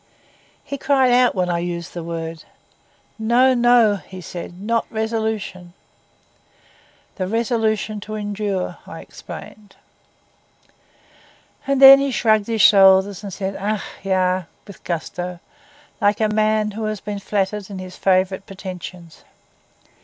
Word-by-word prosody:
He 280 - -6
cried 265 -3 +3
out 245 -1 +4
when 180 -1 0
I 170 - 0
used 170 -1 -5
the 175 - -5
word. 165 -1 -6 0.8
'No, 240 +4 +3
no,' 240 -4 +4
he 185 -1 -12
said, 175 0 -8
'not 230 +3 -1
resolution.' 220 -5 -3 1.4
'The 185 -2 -2
resolution 220 -1 -1
to 215 +1 -7
endure,' 205 -2 -3
I - - -9
explained. 205 -2 -12 1.9
And 275 -1 +1
then 275 0 +10
he 275 0 0
shrugged 220 -5 +2
his 225 -2 0
shoulders, 195 -1 +5
and 200 -2 -7
said, 195 +1 -4
'Ach, 210 +1 -2 0.2
ja,' 185 -2 0 0.2
with 200 - -14
gusto, 175 +1 -4 0.6
like 205 +1 +2
a 215 -1 +2
man 215 0 +1
who 220 +1 -5
has 215 -1 -3
been 205 0 -5
flattered 200 0 -2
in 195 - -7
his 185 0 -8
favourite 190 0 +1
pretensions. 180 -3 -9
205 Hz, 130 wpm, -20 LUFS, 185-220 Hz, 1.9 s, then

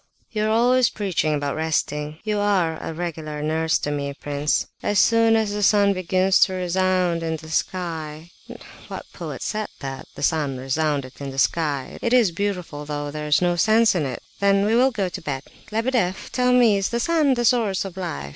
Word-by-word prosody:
"You 215 -1 -1
are - - +1
always 245 +2 +4
preaching 180 -7 -1
about 145 -1 -2
resting; 150 -1 -2
you 210 -1 -1
are 185 -6 +1
a - - -4
regular 155 -3 -5
nurse 160 +1 +1
to 145 - -3
me, 140 -1 -3
prince. 145 +1 -1 0.2
As 205 - 0
soon 230 +2 +4
as 220 -2 +1
the 210 - -2
sun 200 0 +4
begins 185 +1 +2
to 190 - +4
'resound' 185 -1 +1
in 165 -1 -2
the 160 0 -10
sky—what 160 -2 -5
poet - - -6
said 215 0 -2
that? 135 -1 -6
'The - - -7
sun 145 -4 0
resounded 140 0 -1
in 140 - -4
the 135 - -8
sky.' 145 -2 0
It 235 - 0
is 235 -7 +5
beautiful, 180 -5 -3
though 145 -1 -4
there's 150 +2 +1
no 175 0 +2
sense 220 +4 +4
in 160 -6 0
it!—then 195 +10 0
we 215 - +1
will 255 +3 +5
go 210 -7 -2
to 185 +1 -7
bed. 140 -4 -4 0.3
Lebedeff, 225 -4 -1
tell 250 0 +2
me, 240 -5 +5
is 195 - -1
the 235 - -1
sun 300 -1 +2
the 240 0 0
source 220 -6 +2
of 190 -2 -7
life? 70 - -5
180 Hz, 190 wpm, -23 LUFS, 150-210 Hz, 0.3 s, is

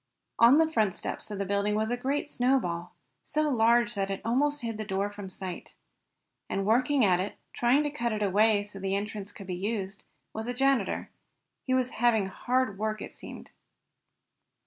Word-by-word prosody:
On 235 +5 +8
the 320 0 +3
front 215 - +1
steps - - -5
of 205 - -5
the 200 - -2
building 200 +2 0
was 220 +2 0
a - - +2
great 270 +4 -1
snowball, 245 -11 0 0.3
so 305 0 0
large 235 0 +3
that 195 -2 -1
it 195 - -2
almost 290 +5 +1
hid 225 -2 -4
the - - -2
door 200 0 -2
from 205 -2 -8
sight. 185 -1 -7 0.7
And 195 0 -1
working 250 +4 +3
at 180 -2 +3
it, 195 +3 -3 0.2
trying 250 +5 +3
to 295 - -2
cut 240 -5 -2
it 210 -1 -1
away 205 +1 +3
so 205 -1 -9
that - - -11
the 195 0 0
entrance 205 0 -4
could 195 - -10
be 185 - -4
used, 195 +1 -3 0.3
was 220 +1 -4
the 245 - -2
janitor. 270 0 +1 0.6
He 260 - +2
was 255 0 +1
having 225 -4 +4
hard 240 +2 -1
work 215 0 -1
it - - -7
seemed. - - -10
220 Hz, 190 wpm, -28 LUFS, 200-245 Hz, 0.7 s, On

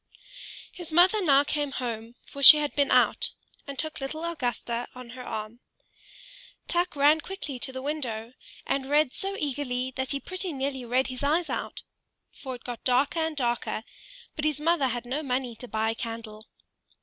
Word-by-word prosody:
His 345 -2 -8
mother 365 +6 +5
now 280 -4 +6
came 290 -1 -2
home, 235 -2 -4
for 280 - -9
she 300 +2 +12
had 295 -1 -2
been 285 -1 +3
out, - - +4 0.4
and 280 -1 -6
took 310 -1 -3
little 310 +5 -4
Augusta 245 -6 -2
on 250 -2 -9
her 250 +1 -8
arm. 215 0 -5 1.1
Tuk 350 -2 0
ran 295 +3 +5
quickly 320 -8 -6
to 265 - -2
the 260 0 -6
window, 250 -6 -3 0.3
and 270 0 -1
read 295 -2 +3
so 395 0 -3
eagerly 260 -4 -2
that 260 0 -2
he 280 - -1
pretty 370 +2 -5
nearly 265 -2 -3
read 255 +3 +2
his 255 -1 -5
eyes 315 +5 +1
out; - - -4 0.5
for 260 -2 -7
it 245 - -13
got 245 -2 -6
darker 270 +6 +2
and 320 -1 -1
darker, 240 -3 -1 0.5
but 310 - -4
his 305 -2 +1
mother 315 -3 +2
had 245 -1 -3
no 265 +5 -2
money 255 -4 -2
to 250 - -7
buy 220 -1 0
a - - -2
candle. 225 -1 -7
270 Hz, 180 wpm, -27 LUFS, 245-305 Hz, 1.1 s, she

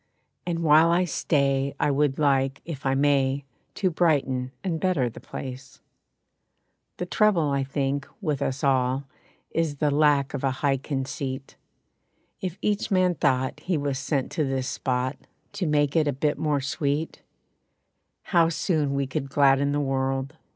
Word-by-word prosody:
And 170 -1 -1
while 155 +1 +6
I 175 +2 +3
stay 140 -4 0
I 145 - +2
would 140 -1 +1
like, 135 -2 +1
if 140 -5 -5
I 135 - +2
may, 140 -1 +2 0.3
To 185 -3 +1
brighten 135 -7 +1
and 170 -4 -1
better 155 -10 +1
the - - -11
place. 130 -1 -8 1.2
The 180 - -3
trouble, 180 -6 +2
I 140 -1 +1
think, 135 0 -2
with 150 -8 -2
us 135 +1 -2
all 130 -1 +2 0.5
Is 165 -3 0
the 145 +1 +1
lack 145 -1 +3
of 140 - -4
a 135 - +3 0.2
high 135 -1 +3
conceit. 135 -1 -4 0.9
If 185 -1 -4
each 210 0 0
man 185 -3 +3
thought 130 -3 0
he 175 +2 -1
was 140 -2 -2
sent 135 0 -1
to 155 - 0
this 135 -2 -1
spot 130 +1 -1 0.4
To 200 -4 -2
make 145 -1 +2
it 155 -2 +3
a 145 - +1
bit 145 +3 -1
more 150 -3 +1
sweet, 145 +3 -2 1.0
How 170 -3 +3
soon 155 -4 0
we 140 0 0
could 135 +1 -4
gladden 140 0 +3
the 145 - 0
world. 135 +1 -1
140 Hz, 160 wpm, -25 LUFS, 135-155 Hz, 1.2 s, while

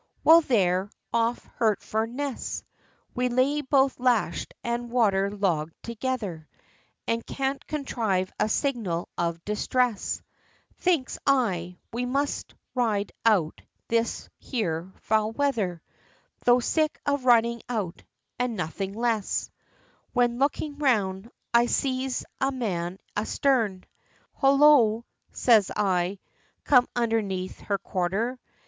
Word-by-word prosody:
Well, 330 +1 +8
there 195 - +2 0.2
off 230 +1 +1
Hertford 220 0 0
Ness, 275 +1 -4 0.5
We 250 0 0
lay 260 +4 +2
both 270 -1 +2
lash'd 240 -9 +1
and 235 0 -2
water 200 -5 +2
logg'd 175 -6 -1
together, 230 -9 -4 0.6
And 230 0 0
can't 275 0 -2
contrive 220 -10 -1
a 215 - +2
signal 215 - -1
of 170 -1 -2
distress; 225 +1 0 0.6
Thinks 340 -8 +1
I, 185 -10 +1 0.2
we 245 +2 -2
must 280 +3 -2 0.2
ride 215 -5 0 0.2
out 180 -8 +2 0.3
this 230 0 0
here 185 - -3
foul 220 0 +1
weather, 220 - -1 0.6
Tho' 245 0 +6
sick 310 +5 0
of 285 -2 0
riding 235 -1 +4
out 210 -8 -3 0.4
and 245 -2 0
nothing 190 +2 -3
less; 225 -2 -1 0.6
When, 240 0 +2
looking 290 +1 -1
round, 210 -7 +1 0.2
I 235 0 +5
sees 260 0 -1
a 270 +1 +1
man 185 -8 -3 0.2
a 210 - 0
starn: 225 -9 +1 0.5
Hollo! 270 -5 +5 0.3
says 220 -6 +4
I, 185 -1 +1 0.5
come 250 -3 +5
underneath 215 -6 -1
her 200 - -1
quarter! 195 +7 -2
230 Hz, 115 wpm, -26 LUFS, 195-255 Hz, 0.6 s, Well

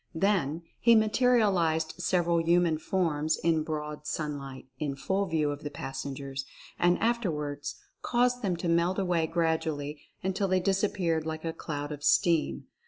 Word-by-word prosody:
Then 170 -4 +1 0.2
he 235 0 +6
materialized 210 -9 +3
several 175 -2 +2
human 170 -1 +3
forms 160 -4 0
in 165 -2 +2
broad 150 -1 -5
sunlight 140 -4 -4
in 145 -3 -2
full 195 +7 -1
view 155 -3 +1
of 145 0 -6
the 145 - -4
passengers, 135 -1 -5 0.4
and 175 0 +4
afterwards 155 -11 -1 0.3
caused 245 0 +1
them 185 -6 0
to 170 - -3
melt 170 +2 +2
away 175 -4 +1
gradually 160 -3 -1 0.2
until 190 +1 0
they 185 0 +2
disap 195 +2 +1
peared 165 -4 0
like 160 0 -4
a 165 - -2
cloud 145 -2 -5
of 145 -1 -7
steam. 170 0 +2
165 Hz, 150 wpm, -29 LUFS, 150-185 Hz, 0.4 s, he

